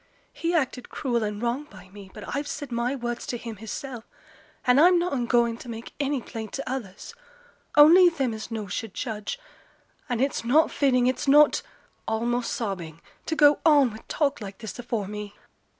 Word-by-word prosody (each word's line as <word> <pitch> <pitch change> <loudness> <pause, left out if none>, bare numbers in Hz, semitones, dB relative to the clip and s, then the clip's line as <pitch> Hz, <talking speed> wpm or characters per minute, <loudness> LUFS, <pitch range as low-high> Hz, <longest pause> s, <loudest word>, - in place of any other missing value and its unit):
He 340 +1 -1
acted 265 -5 -1
cruel 240 -5 -1
and 210 -1 -3
wrong 240 +5 -2
by 190 -8 -15
me. 195 0 -12
But 210 +6 -7
I've 285 +1 -2
said 290 -3 -6
my 240 +3 -1
words 240 -2 -4
to 240 - -2
him 230 -2 -8
hissel', 225 +3 -6 0.6
and 250 +3 +5
I'm 355 +2 +6
noane 280 -9 -1
going 235 -1 +2
to 245 - -10
make 230 0 -8
any 280 -3 -1
plaint 220 -2 -7
to 275 - -5
others; 240 - -6 0.6
only 345 +5 +9
them 270 -8 -2
as 220 +1 -7
knows 215 -5 -5
should 225 -4 -5
judge. 220 - -4 0.7
And 245 -2 -1
it's 275 -1 0
not 290 +7 +3
fitting, 255 -3 +2
it's 260 +3 0
not' 295 +2 +6 0.5
(almost 235 +2 -1
sobbing), 175 -8 -4 0.3
'to 320 - -1
go 295 -1 +5
on 290 -6 +5
wi' 220 - -9
talk 285 -4 0
like 195 -1 -7
this 220 +1 -8
afore 230 -4 -3
me.' 210 0 -7
240 Hz, 180 wpm, -26 LUFS, 220-280 Hz, 0.7 s, only